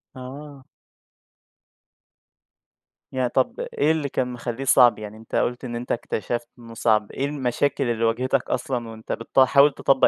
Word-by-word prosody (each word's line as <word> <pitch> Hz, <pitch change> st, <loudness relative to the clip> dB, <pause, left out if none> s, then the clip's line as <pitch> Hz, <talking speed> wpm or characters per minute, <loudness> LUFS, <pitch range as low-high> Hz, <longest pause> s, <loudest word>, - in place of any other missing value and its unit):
آه. 135 Hz, +2 st, -9 dB, 2.5 s
يعني 130 Hz, -2 st, 0 dB
طَب 130 Hz, +1 st, 0 dB
إيه 150 Hz, +2 st, 0 dB
اللي 155 Hz, -3 st, -1 dB
كان 130 Hz, -, -1 dB
مخلّيه 120 Hz, +1 st, -5 dB
صعب، 125 Hz, -3 st, +6 dB
يعني 105 Hz, 0 st, -8 dB
أنت 110 Hz, 0 st, -8 dB
قُلت 120 Hz, +1 st, 0 dB
إن 120 Hz, -1 st, -5 dB
أنت 120 Hz, +1 st, -5 dB
اكتشفت 120 Hz, +1 st, -2 dB
إنه 115 Hz, -1 st, -11 dB
صعب، 110 Hz, -2 st, +1 dB
إيه 135 Hz, -, -2 dB
المشاكل 140 Hz, -1 st, 0 dB
اللي 115 Hz, -1 st, -1 dB
واجهتك 125 Hz, +3 st, +1 dB
أصلًا 125 Hz, -1 st, -2 dB
وأنت 110 Hz, 0 st, -9 dB
بتحاول 135 Hz, +4 st, +4 dB
تطبّق 135 Hz, 0 st, +3 dB
125 Hz, 145 wpm, -24 LUFS, 115-135 Hz, 2.5 s, صعب